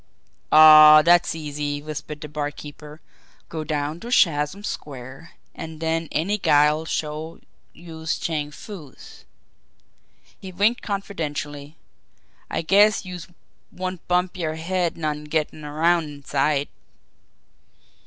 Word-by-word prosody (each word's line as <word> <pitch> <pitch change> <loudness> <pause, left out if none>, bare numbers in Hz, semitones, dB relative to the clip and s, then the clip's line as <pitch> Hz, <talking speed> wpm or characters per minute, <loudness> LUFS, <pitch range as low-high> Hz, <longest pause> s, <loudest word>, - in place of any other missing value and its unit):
"Aw, 155 0 +9
dat's 175 0 +4
easy," 145 -2 -4
whispered 150 0 -7
the - - -6
barkeeper. 150 +1 -7 0.5
"Go 160 -1 -5
down 150 +1 -3
to 235 - -8
Chatham 165 -3 +2
Square, 135 - -8 0.2
an' 160 -1 -8
den 165 +1 -2
any 200 +6 -1
guy'll 150 -1 +3
show 155 +1 -4 0.3
youse 165 -1 -5
Chang 150 -3 -3
Foo's." 155 -3 -12 1.1
He 190 - -9
winked 205 +6 +1
confidentially. 150 -7 -5 0.7
"I - - -2
guess 205 +4 +4
youse 180 -2 -8 0.4
won't 185 -2 -6
bump 180 +1 0
yer 160 -3 -3
head 175 +1 -2
none 150 -2 -3
gettin' 155 0 -2
around 160 +3 +1
inside." 145 0 -1
155 Hz, 110 wpm, -23 LUFS, 150-175 Hz, 1.1 s, Aw